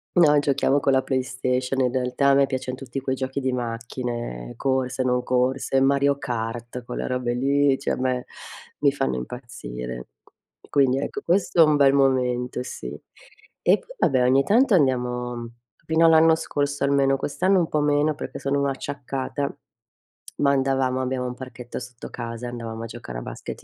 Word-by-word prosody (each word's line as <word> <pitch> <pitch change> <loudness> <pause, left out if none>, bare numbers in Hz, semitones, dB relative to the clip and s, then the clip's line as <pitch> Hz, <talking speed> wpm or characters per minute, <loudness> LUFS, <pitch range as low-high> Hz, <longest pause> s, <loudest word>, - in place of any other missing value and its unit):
No, 150 -4 +6
giochiamo 140 0 +2
con 135 - +2
la 130 0 +3
PlayStation, 130 0 -1
in 125 -1 +2
realtà 130 +2 +1
a - - +6
me 140 0 +5
piaccion 130 -1 -4
tutti 135 0 -6
quei 130 0 -1
giochi 130 +1 -3
di 130 -1 -1
macchine, 115 - -4
corse, 130 -1 0
non 125 -1 +1
corse, 130 +1 +1
Mario 140 +1 +3
Kart 120 0 -4
quelle - - -4
robe 125 -1 -1
lì, 140 +2 +2
cioè - - -1
a - - -3
me 125 -1 -1 0.5
mi 140 -2 +4
fanno 65 - -1
impazzire. 60 - -7 0.6
Quindi 135 -2 +3
ecco, - - -4
questo 175 -1 +2
è 160 - +9
un 155 - +3
bel 140 -1 +5
momento, 125 -2 +1
sì. - - -7 0.7
E - - +4
poi - - -15
vabbè, 130 -5 +3
ogni 135 +2 +4
tanto 235 - +3
andiamo 125 -4 +1
mhmm 120 -1 -6 0.4
fino 160 +1 +3
all'anno 160 0 +6
scorso 145 -3 -2
almeno 140 -1 +3
quest'anno 185 +7 +1
un 170 - +1
po' 150 - +1
meno, 145 +1 +2
perché - - -6
sono 140 0 0
acciaccata, 140 0 -4 0.8
ma 140 -1 +3
andavamo 135 -1 +1
abbiamo 130 -1 -2
un 125 - -4
parchetto 125 -2 -8
sotto 125 0 -9
casa 115 0 -6
e - - -4
andavamo 115 -2 -6
a - - -4
giocare 115 - -7
a - - -8
basket - - -8
130 Hz, 175 wpm, -24 LUFS, 125-140 Hz, 0.8 s, è